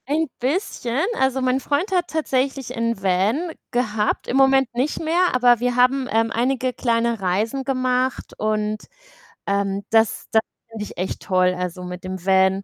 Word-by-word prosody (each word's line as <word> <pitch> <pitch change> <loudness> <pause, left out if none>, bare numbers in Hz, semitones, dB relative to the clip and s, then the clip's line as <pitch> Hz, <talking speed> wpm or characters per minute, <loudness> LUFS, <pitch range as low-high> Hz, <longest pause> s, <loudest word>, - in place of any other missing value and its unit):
Ein 315 +3 +1
bisschen. 265 - -1
Also, 265 0 +1
mein 255 +1 +1
Freund 295 +8 -1
hat 360 -2 +1
tatsächlich 270 -4 -1
'n 230 -3 -1
Van 200 - +1 0.2
gehabt, 220 -4 0
im - - -2
Moment 270 -1 +4
nicht 260 +5 -1
mehr, 345 +3 +2
aber 245 -2 +4
wir 245 0 0
haben, 255 +1 +3
ähm, 225 0 +2
einige 255 +2 0
kleine 235 -2 0
Reisen 215 +9 0
gemacht 255 -1 -1
und, 215 0 -1 0.7
ähm, 200 0 0
das 225 -1 +2
das 220 - +4 0.3
finde 225 -2 -6
ich - - -11
echt 185 +2 -3
toll, 185 -1 +2
also, 180 0 -4
mit 180 0 -7
dem 185 -1 -6
Van 190 0 +3
240 Hz, 160 wpm, -22 LUFS, 205-265 Hz, 0.7 s, Moment